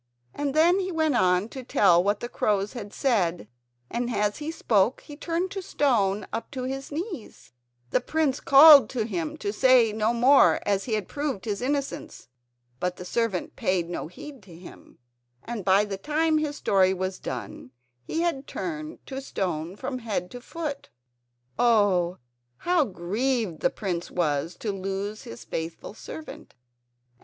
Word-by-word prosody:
And 285 -1 -3
then 345 +4 +5
he 375 -1 -2
went 315 -3 +1
on 180 -2 +3
to 265 - -7
tell 180 -7 +4
what 205 +1 0
the 240 - -3
crows 205 -3 0
had 210 -5 -7
said, 180 - 0 0.4
and 240 - -2
as 210 -2 0
he 300 +1 -4
spoke 230 -7 +1
he 295 - -11
turned 340 +4 -2
to 395 -1 -4
stone 210 - +1
up 225 - -4
to 260 -2 -4
his 270 +2 -5
knees. 335 - -7 0.4
The - - +2
prince 295 0 0
called 280 -3 +8
to 235 -4 -2
him 175 -8 -3
to 205 - -3
say 245 -2 +5
no 215 +1 +1
more 255 +4 +5
as 200 -1 0
he 230 - -3
had 210 -4 -3
proved 285 -9 -3
his 205 -1 -3
innocence. 275 - -3 0.5
But 180 0 -1
the 180 - -9
servant 225 -2 -2
paid 175 -2 -1
no 170 - -4
heed 280 - -11
to 185 -4 -14
him, 175 - -14 0.5
and 230 -4 -5
by 195 +3 +4
the 200 -2 -5
time 310 +6 +1
his 300 -1 -2
story 190 -7 +2
was 185 0 -3
done 125 -1 -6 0.3
he 325 - -2
had 305 -6 -1
turned 315 -2 -6
to 270 0 -6
stone 180 - -3
from 255 +3 -5
head 205 -6 -3
to 245 - -8
foot. 300 0 -6 0.7
Oh! 200 -7 +3 0.4
how 350 -4 +2
grieved 210 - -2
the - - +2
prince 180 -4 -4
was 160 -1 -1
to 215 - -1
lose 195 +2 -4
his 115 0 -10
faithful 165 - -5
servant! 315 +7 -10
225 Hz, 165 wpm, -26 LUFS, 190-280 Hz, 0.7 s, called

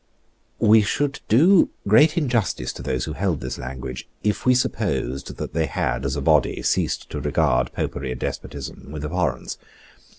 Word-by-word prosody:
We 110 +1 +6
should 140 +7 -1
do 165 - +5 0.2
great 150 - +5
injustice 125 - 0
to - - -9
those 65 0 -2
who 75 - -4
held 90 -4 -1
this - - -5
language, 65 0 -6
if 105 +4 -1
we 125 - +6
supposed 70 - -1
that - - -5
they 80 -1 +1
had, 65 +2 -1
as 65 - -2
a 70 - -2
body, - - +2
ceased - - 0
to - - -4
regard 60 0 +1
Popery 70 -2 -3
and 65 0 -4
despotism - - -6
with 75 -1 -5
abhorrence. 90 +2 -2
80 Hz, 165 wpm, -23 LUFS, -, 0.2 s, We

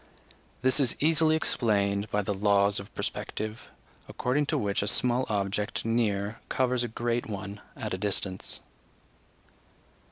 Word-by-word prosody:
This 130 +3 +4
is 130 -4 +2
easily 155 +1 +4
explained 105 -8 +1
by 105 0 0
the 100 +1 -1
laws 100 0 +3
of 100 - -10
perspective, 110 +2 -4 0.4
according 140 +4 0
to - - +1
which 100 -1 0
a 100 - -1
small 125 +3 +3
object 100 0 -1
near 110 -2 0
covers 125 -1 +1
a - - -1
great 120 +1 -1
one 100 -1 -6
at - - -4
a 95 - -3
distance. 95 -2 -2
105 Hz, 135 wpm, -28 LUFS, 100-120 Hz, 0.4 s, This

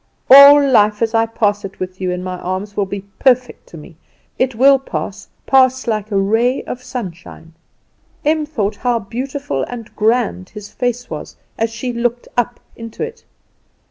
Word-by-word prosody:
All 280 +1 +9
life 210 -4 +3
as 225 0 -1
I 225 0 +2
pass 205 -2 0 0.2
with 185 0 -6
you 185 - -1
in 180 0 -3
my 185 -1 -5
arms 190 +3 -5
will 200 -2 -1
be 200 +1 -5 0.2
perfect 255 -1 +1
to 170 - -11
me. 155 +1 -13 0.4
It 255 -2 0
will 270 +3 +5
pass, 205 -6 -6 0.2
pass 260 -1 +3
like 215 -3 -2
a 200 - -1
ray 225 +6 +1
of 250 - -7
sunshine." 175 -9 -8 0.7
Em 305 0 +1
thought 215 -8 -2
how 245 -1 0
beautiful 240 - -4
and 235 -3 -9
grand 220 -4 0
his 210 -1 -10
face 245 -1 -2
was 150 - -7 0.2
as 225 0 -1
she 245 +2 -5
looked 240 0 -2
up 245 0 -1 0.2
into 230 - -7
it. 460 0 -8
225 Hz, 170 wpm, -17 LUFS, 200-255 Hz, 0.7 s, All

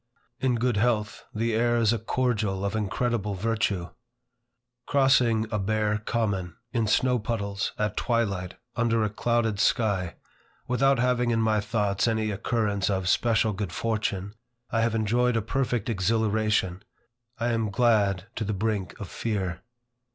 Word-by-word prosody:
In 130 -2 +1
good 120 -1 +1
health, 110 -1 0
the 115 +1 -1
air 120 +1 +2
is 115 -1 +3
a 115 - -1
cordial 110 -4 -1
of 100 - -2
incredible 110 -1 -1
virtue. 100 -3 -1 1.0
Crossing 125 -5 +3
a 105 - 0
bare 105 +1 0
common, 100 -6 -2 0.2
in 115 -3 +1
snow 125 +3 +2
puddles, 100 -3 -2
at 105 -1 -1
twilight, 100 -7 -1 0.2
under 115 -1 +2
a 105 - -1
clouded 115 -2 0
sky, 100 -5 +1 0.5
without 135 +2 +3
having 125 -1 +2
in 115 -1 +2
my 110 -1 +2
thoughts 105 -2 0
any 110 -1 0
occurrence 105 -1 0
of 95 -2 -1
special 110 +1 +2
good 100 -3 -4
fortune, 105 -3 -2 0.4
I 115 - +1
have 115 0 +1
enjoyed 115 +2 +2
a - - +1
perfect 120 -2 -1
exhilaration. 110 -2 +1 0.6
I 120 +1 0
am 115 -2 0
glad 100 -4 +2
to - - -1
the 105 0 -2
brink 100 -2 -2
of 105 - -6
fear. 95 -5 -3
110 Hz, 145 wpm, -26 LUFS, 100-115 Hz, 1.0 s, is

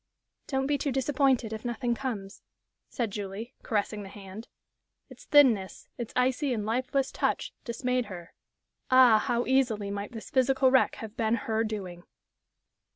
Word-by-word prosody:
"Don't 265 -1 0
be 285 0 0
too 285 - -1
disappointed 265 -3 +1
if 220 - -6
nothing 240 0 -1
comes," 220 -6 -5 0.5
said 230 -4 -2
Julie, 205 +4 -6
caressing 210 -1 -1
the 195 - -8
hand. 200 +2 -10 0.6
Its - - -14
thinness, 240 -11 +3
its 235 -2 -6
icy 255 +2 +1
and 210 -2 -3
lifeless 260 +4 0
touch, - - -1
dismayed 250 +1 -1
her. 180 -4 -10 0.6
Ah, 255 -4 +7
how 240 +2 0
easily 235 -6 +1
might 200 0 -5
this 225 - -9
physical 265 0 +3
wreck 260 - +4
have 220 -1 -8
been 225 0 +1
her 220 0 -1
doing! 195 -6 -5
235 Hz, 150 wpm, -28 LUFS, 210-260 Hz, 0.6 s, Ah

